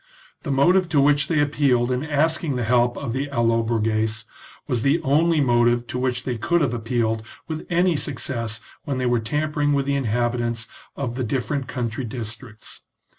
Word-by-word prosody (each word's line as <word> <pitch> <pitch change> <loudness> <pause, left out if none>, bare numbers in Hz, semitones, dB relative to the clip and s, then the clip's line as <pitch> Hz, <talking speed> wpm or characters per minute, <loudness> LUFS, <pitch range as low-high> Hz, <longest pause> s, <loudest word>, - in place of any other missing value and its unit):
The - - -6
motive 175 +7 +3
to 155 -3 +3
which 145 +1 +4
they 160 -3 +1
appealed 140 -4 +2
in 125 +2 -1
asking 155 -1 0
the 125 - -1
help 120 +1 +2
of 140 -5 -4
the 135 +3 -2
Allobroges, 115 -2 0 0.4
was 120 -3 -1
the 140 +7 +3
only 160 +4 +3
motive 120 -2 +3
to 125 - -4
which 125 -1 -1
they 125 -3 -3
could 170 +8 +2
have 135 -5 +1
ap 115 -2 -5
pealed 115 -2 0 0.3
with 155 -1 -5
any 175 0 +3
success 115 -6 -3 0.2
when 140 -2 -3
they 130 - -1
were 120 -1 +2
tampering 150 +5 0
with 140 -1 +1
the 140 - 0
inhabitants 120 -2 -1 0.3
of 130 -4 -3
the 130 +1 -3
different 130 +3 -2
country 125 0 -3
districts. 115 -1 -8
125 Hz, 175 wpm, -23 LUFS, 115-145 Hz, 0.4 s, which